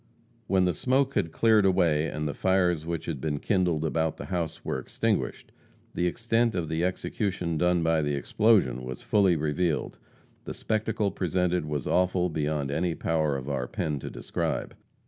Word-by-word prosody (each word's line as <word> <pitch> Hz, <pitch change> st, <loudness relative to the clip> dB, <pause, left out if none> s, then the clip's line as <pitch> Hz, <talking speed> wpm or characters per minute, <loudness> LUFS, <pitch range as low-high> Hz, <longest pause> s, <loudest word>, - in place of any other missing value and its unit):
When 95 Hz, -1 st, +3 dB
the 90 Hz, -, +1 dB
smoke 135 Hz, -, +1 dB
had 80 Hz, -, 0 dB
cleared 110 Hz, +2 st, +4 dB
away 85 Hz, -5 st, +3 dB
and 75 Hz, 0 st, -3 dB
the 75 Hz, -, -2 dB
fires 90 Hz, -4 st, +1 dB
which 85 Hz, -1 st, -3 dB
had 75 Hz, -6 st, -4 dB
been 75 Hz, -2 st, -1 dB
kindled 90 Hz, -3 st, +1 dB
about 80 Hz, 0 st, 0 dB
the -, -, -7 dB
house 85 Hz, -4 st, -3 dB
were -, -, -1 dB
extinguished, 65 Hz, -, -2 dB, 0.4 s
the 90 Hz, -, 0 dB
extent 115 Hz, +3 st, +1 dB
of 85 Hz, -3 st, -2 dB
the 80 Hz, +1 st, -1 dB
execution 90 Hz, -1 st, -2 dB
done 90 Hz, +1 st, +2 dB
by 80 Hz, -1 st, +2 dB
the 75 Hz, -1 st, 0 dB
explosion 70 Hz, -, +2 dB
was 65 Hz, 0 st, -7 dB
fully 100 Hz, -4 st, +3 dB
revealed. 80 Hz, +2 st, -1 dB, 0.5 s
The -, -, -5 dB
spectacle 110 Hz, -2 st, -1 dB
presented 90 Hz, -2 st, 0 dB
was 75 Hz, -3 st, -3 dB
awful 90 Hz, 0 st, +2 dB
beyond 75 Hz, -3 st, -1 dB
any 85 Hz, +3 st, 0 dB
power 80 Hz, -4 st, 0 dB
of 65 Hz, 0 st, -7 dB
our 70 Hz, -3 st, -2 dB
pen 75 Hz, +1 st, -2 dB
to -, -, -6 dB
describe. -, -, -3 dB
85 Hz, 170 wpm, -27 LUFS, 75-95 Hz, 0.5 s, cleared